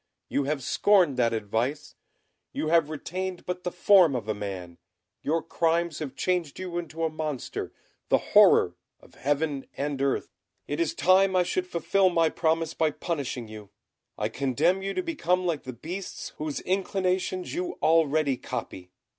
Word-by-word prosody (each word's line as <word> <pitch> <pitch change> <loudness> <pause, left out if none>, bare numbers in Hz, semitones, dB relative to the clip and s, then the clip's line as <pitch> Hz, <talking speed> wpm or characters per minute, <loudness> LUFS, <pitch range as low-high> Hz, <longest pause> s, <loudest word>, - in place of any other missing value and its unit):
You 140 - 0
have 145 -1 -2
scorned 180 -1 +3
that 120 -2 +3
advice; 115 +7 -2 0.6
you 155 - -2
have 165 -2 +4
retained 180 +4 -5
but 180 0 -4
the 180 - -2
form 175 -5 +5
of 120 -3 -3
a 110 - 0
man; 95 -4 -6 0.4
your 160 +2 0
crimes 165 0 0
have 150 -4 -5
changed 180 -5 -1
you 180 -2 -3
into 165 -1 -5
a 160 - +2
monster, 155 -4 -4 0.4
the - - +5 0.2
horror 90 - +7 0.3
of - - -20
heaven 145 0 -1
and 140 -1 -2
earth. 140 -1 0 0.4
It 145 - -3
is 170 -2 0
time 190 +1 +4
I 180 - +4
should 180 +1 -2
fulfil 185 +2 +2
my 165 -2 +3
promise 160 0 0
by 160 - +2
punishing 140 -7 -4
you. 105 -2 -10 0.5
I 105 - 0
condemn 135 - +1
you 195 0 -3
to 370 - -1
become 185 - 0
like 165 -6 -1
the 130 - -4
beasts 175 - -6
whose 150 -1 -3
inclinations 185 -1 -1
you 355 +1 -3
already 155 -4 +3
copy. 90 -6 -6
160 Hz, 165 wpm, -27 LUFS, 140-180 Hz, 0.6 s, horror